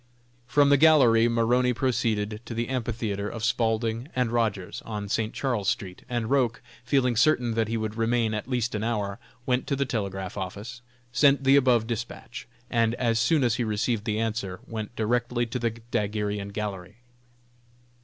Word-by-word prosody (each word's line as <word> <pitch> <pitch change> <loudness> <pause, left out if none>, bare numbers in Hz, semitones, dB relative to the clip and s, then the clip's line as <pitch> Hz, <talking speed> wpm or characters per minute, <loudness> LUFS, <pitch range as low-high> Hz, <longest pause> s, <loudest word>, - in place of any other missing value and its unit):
From 145 +1 +4
the 145 - +6
gallery 125 -8 +6
Maroney 120 +2 +2
proceeded 110 -4 0
to 115 - -6
the 115 +1 -2
amphitheatre 115 -5 -2
of 115 - -7
Spaulding 115 +1 0
& - - -24
Rogers, 115 -6 0
on 105 -2 -5
St. 110 +2 -1
Charles 120 -8 -1
street, 95 -2 -4
and 120 -3 -1
Roch, 125 -2 +1 0.2
feeling 125 -1 +2
certain 125 -1 +3
that 110 -1 0
he 115 +1 -1
would 110 -1 -3
remain 115 -1 +1
at 110 +3 -4
least 120 -2 -1
an 105 0 -2
hour, 105 -3 -2 0.3
went 125 0 0
to 140 - 0
the 140 0 0
telegraph 100 -6 -4
office, 105 +7 -6 0.3
sent 140 +2 +4
the 135 +1 +5
above 125 -5 +4
despatch, 115 -2 -6 0.2
and 115 -1 +1
as 115 -3 +1
soon 140 +5 +3
as 120 -1 +2
he 125 - 0
received 110 0 -1
the 105 -2 -1
answer, 110 -5 -2
went 110 0 -6
directly 120 +2 0
to 115 +2 -4
the 115 -1 +1
daguerrean 105 -3 -3
gallery. 100 -2 -5
115 Hz, 170 wpm, -26 LUFS, 105-125 Hz, 0.3 s, the